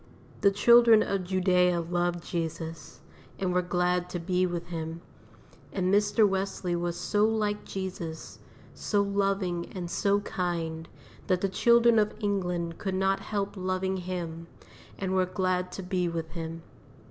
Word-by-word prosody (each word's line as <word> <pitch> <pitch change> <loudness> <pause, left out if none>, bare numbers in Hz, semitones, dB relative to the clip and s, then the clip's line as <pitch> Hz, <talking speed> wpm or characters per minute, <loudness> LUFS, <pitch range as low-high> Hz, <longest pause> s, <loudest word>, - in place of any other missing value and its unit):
The 200 - +6
children 230 +2 +6
of 195 -2 -2
Judea 180 -1 +2
loved 175 0 -1
Jesus, 165 -2 -5 0.4
and 185 -2 -1
were 180 - +3
glad 180 0 0
to 175 - -4
be 180 +2 +1
with 175 -1 -5
Him; 165 0 -5 0.7
and 185 -1 0
Mr. 210 +1 +4
Wesley 190 -2 -2
was 175 0 -2
so 205 +3 +1
like 215 -1 0
Jesus, 180 -4 -6 0.3
so 205 -1 0
loving 195 -3 -1
and 175 -2 -5
so 200 -1 +2
kind, 165 -4 -3 0.4
that 185 -3 +1
the 195 - +1
children 235 +3 +5
of 210 0 +1
England 180 -5 -2
could 190 -2 -2
not 195 +1 +1
help 200 -1 -3
loving 185 0 -1
him, 170 -2 -5 0.5
and 190 -1 -2
were 185 -1 +2
glad 185 -1 -1
to 190 - -6
be 180 -1 -1
with 165 -1 -4
him. 165 0 -6
185 Hz, 145 wpm, -28 LUFS, 175-195 Hz, 0.7 s, The